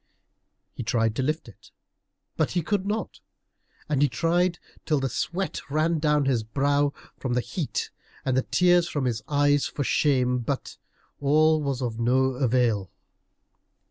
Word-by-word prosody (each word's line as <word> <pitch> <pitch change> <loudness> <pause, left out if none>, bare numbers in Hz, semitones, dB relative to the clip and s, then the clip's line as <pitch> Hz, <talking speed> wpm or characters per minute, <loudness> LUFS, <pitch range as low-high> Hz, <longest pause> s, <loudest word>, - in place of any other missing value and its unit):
He - - -6
tried 115 -1 0
to - - 0
lift 155 +3 -1
it, 115 - -16 0.7
but - - 0
he 175 -2 0
could 200 +3 -1
not. 215 +2 -3 0.7
And 145 -2 0
he 145 - +4
tried 170 +7 +1 0.3
till 155 -3 +1
the 135 0 -1
sweat 170 +8 -3
ran 155 +3 +1
down 150 -2 +2
his 130 -4 +2
brow 140 +5 +1 0.3
from 130 -2 -2
the - - +3
heat, 125 - -3 0.3
and 130 - +1
the 130 - +3
tears 175 +3 +3
from 145 -3 -2
his 115 -3 -1
eyes 145 -1 +2
for 145 - -3
shame, 125 -3 +2
but 130 +3 -4 0.4
all 155 +2 +3
was 135 -3 -2
of 115 -2 -3
no 125 +3 +3
avail. 120 -6 +1
140 Hz, 155 wpm, -26 LUFS, 125-155 Hz, 0.7 s, he